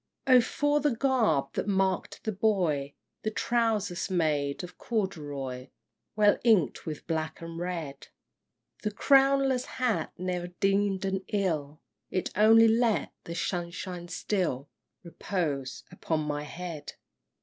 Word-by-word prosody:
X. 260 - +5
Oh 250 - +8
for 290 +5 +1
the 290 -4 +1
garb 225 - +2
that - - -2
marked 190 -2 0
the 220 - -1
boy, 180 -9 0 0.3
The 215 - -1
trousers 215 -5 0
made 150 -5 0
of 180 - -10
corduroy, 145 - -3 0.5
Well 210 -1 +4
ink'd 215 - +3
with 155 -2 -5
black 160 -1 -2
and 165 0 -7
red; 165 -6 -5 0.7
The 210 - -1
crownless 270 +2 +3
hat, 250 -4 0
ne'er 180 -1 -2
deem'd 195 -1 +2
an 190 0 -1
ill 160 -7 -1 0.3
It 185 - -2
only 225 +2 +7
let 225 -1 +2
the 170 - -5
sunshine 175 0 -4
still 170 -6 -2 0.3
Repose 155 -7 -3
upon 160 -1 -2
my 150 -1 -3
head! 170 -1 -7
185 Hz, 125 wpm, -29 LUFS, 155-220 Hz, 0.7 s, Oh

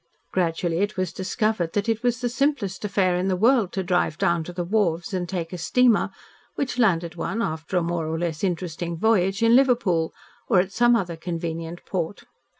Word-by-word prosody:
Gradually 170 -1 0
it 205 +1 -1
was 185 -2 -1
discovered 190 -2 -1
that 205 +1 0
it 225 -1 0
was 245 +1 0
the 245 - 0
simplest 240 -7 -1
affair 195 -3 +1
in 180 +2 0
the 190 - +1
world 225 -1 +3
to 190 - -1
drive 175 -3 0
down 170 -1 +1
to 180 - -6
the 175 0 -3
wharves 175 -3 0
and 180 -2 -2
take 175 -2 -4
a 180 - -5
steamer 240 +4 +3 0.5
which 265 -3 -2
landed 170 -7 +2
one, 195 +5 -3
after 160 -3 -2
a 175 - +2
more 170 -1 -2
or 160 +1 -2
less 165 -1 -3
interesting 170 -2 -2
voyage, 195 0 +2
in 230 +1 +6
Liverpool, 235 -11 +3 0.4
or 190 - +4
at 185 +1 0
some 240 +3 +4
other 180 -6 -1
convenient 165 0 -5
port. 185 +1 -3
185 Hz, 195 wpm, -24 LUFS, 170-220 Hz, 0.5 s, in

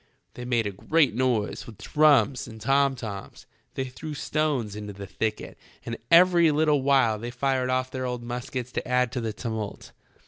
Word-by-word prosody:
They 125 - -8
made 120 -3 +1
a 100 - -2
great 145 - +2
noise 120 -3 -1
with 110 -4 -11
drums 145 +1 +3
and 110 -2 -10
tom 135 +3 +2
toms, 105 -5 -8 0.3
they 135 - -1
threw 150 +4 -7
stones 145 -8 -1
into 105 -1 -6
the 100 0 -8
thicket, 110 +3 -4 0.3
and 115 - -3
every 170 -1 +6
little 150 -1 +2
while 130 -6 +3
they 120 +2 -5
fired 130 +1 0
off 130 0 0
their 130 -1 -3
old 125 -1 -4
muskets 125 +1 -5
to - - -4
add 125 -1 +2
to 125 - -3
the 115 -1 -2
tumult. 110 -1 -5
125 Hz, 180 wpm, -26 LUFS, 110-140 Hz, 0.3 s, every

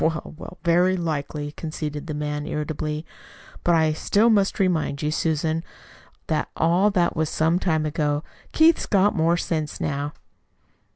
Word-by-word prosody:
"Well, 160 -1 -1
well, 180 - -10
very 180 +2 +3
likely," 150 -3 -3
conceded 150 -1 -5
the 155 - -4
man 150 0 -3
irritably; 150 +1 -3 0.6
"but 175 - +4
I 160 -1 +3
still 210 +8 +3
must 200 -2 +2
remind 165 -6 0
you, 150 - 0
Susan, 160 0 0 0.6
that 155 -1 -1
all 175 +5 +3
this 180 -4 +2
was 160 -2 -1
some 165 +3 +1
time 160 -5 0
ago. 150 0 -1 0.3
Keith's 320 +1 +4
got 205 +1 +3
more 165 0 +2
sense 155 -3 -2
now." 145 0 -2
160 Hz, 150 wpm, -24 LUFS, 150-175 Hz, 0.6 s, but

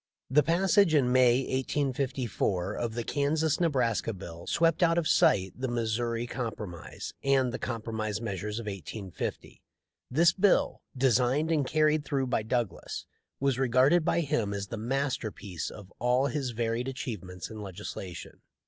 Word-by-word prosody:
" - - -65
The 150 +3 +6
passage 175 +2 +3
in 130 -4 +3
May, 125 0 +5
1854, 130 -8 -1
of 115 0 -3
the 120 - -2
Kansas 150 +4 +1
Nebraska 125 -9 +1
bill 85 -3 -9
swept 165 +1 +2
out 170 -1 +4
of 170 -2 +1
sight 95 -1 +3
the 130 +1 -3
Missouri 115 0 -1
Com 120 -1 -3
promise 90 -6 -7
and 135 -2 +3
the - - -3
Compromise 110 -3 -3
measures 105 -1 -4
of 115 - -4
1850. 95 -1 -6 0.5
This 170 +6 +4
bill, 195 +1 +2 0.2
designed 130 +4 +2
and 145 -5 +2
carried 155 +1 +3
through 140 -3 -1
by 125 -3 0
Douglas, 115 0 -3 0.3
was 135 -2 +1
regarded 135 +6 +4
by 170 - +2
him 110 -9 -1
as 100 -1 -4
the - - -4
masterpiece 115 - -3
of 100 -3 -12
all 125 +3 +2
his 135 -1 -1
varied 115 +1 -1
achievements 100 -9 -5
in 110 -1 -7
legislation. 95 -2 -7
125 Hz, 150 wpm, -29 LUFS, 110-140 Hz, 0.5 s, The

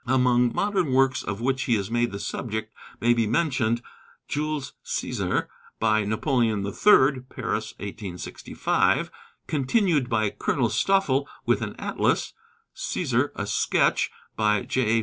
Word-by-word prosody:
Among 125 -1 +3
modern 190 -9 0
works 130 0 +3
of 100 +2 -5
which 130 +2 0
he 120 - +3
is 100 0 -3
made 120 0 +1
the 100 - -5
subject 110 0 -4 0.3
may 120 +1 +4
be 115 -2 +1
mentioned 120 -4 +1 0.4
'Jules 150 -2 -2
César,' - - -1 0.3
by 110 -1 +2
Napoleon 110 -2 +1
III. 135 - +4
(Paris, 110 -3 -3
1865); 100 -3 -1 0.3
continued 150 - +1
by 110 -3 +1
Colonel 120 -5 0
Stoffel, 140 - +2 0.2
with - - +2
an - - -4
Atlas; - - 0 0.4
'Cæsar, - - 0
a - - -3
Sketch,' - - +2 0.3
by 105 -2 +2
J. 115 -3 +1
120 Hz, 130 wpm, -25 LUFS, 110-135 Hz, 0.4 s, may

